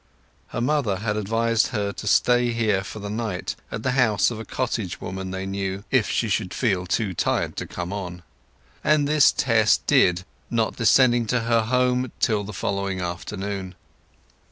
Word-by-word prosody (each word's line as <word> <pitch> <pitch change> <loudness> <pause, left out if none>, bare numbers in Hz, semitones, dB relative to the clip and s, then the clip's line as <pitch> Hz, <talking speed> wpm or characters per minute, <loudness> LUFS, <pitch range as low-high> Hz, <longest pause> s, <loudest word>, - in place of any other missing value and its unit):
Her - - -4
mother 130 -6 +1
had 105 +2 -2
advised 115 +2 +1
her 105 -4 -2
to 105 - -7
stay 120 +2 +3
here 105 -4 +1
for 100 - -8
the 105 -1 -6
night, 105 -4 -3 0.2
at 110 - -5
the 130 - +1
house 115 -6 +3
of 115 - -6
a 110 - -7
cottage 115 -8 -3
woman 95 0 -5
they 95 +1 -4
knew, 95 0 -3
if 130 -4 +3
she 115 - 0
should 100 -2 -1
feel 95 -7 0
too 100 0 0
tired - - -1
to - - -4
come 90 +2 -5
on; 90 -3 -6 0.6
and 150 -1 +3
this 150 -1 +5
Tess 115 -3 +3
did, 90 0 +3 0.2
not 115 -2 0
descending 120 0 +4
to 125 +1 +1
her 115 0 +2
home 125 +2 +1
till 105 -3 +1
the 105 - -7
following 100 -1 -2
afternoon. 95 +2 -5
110 Hz, 175 wpm, -24 LUFS, 95-120 Hz, 0.6 s, this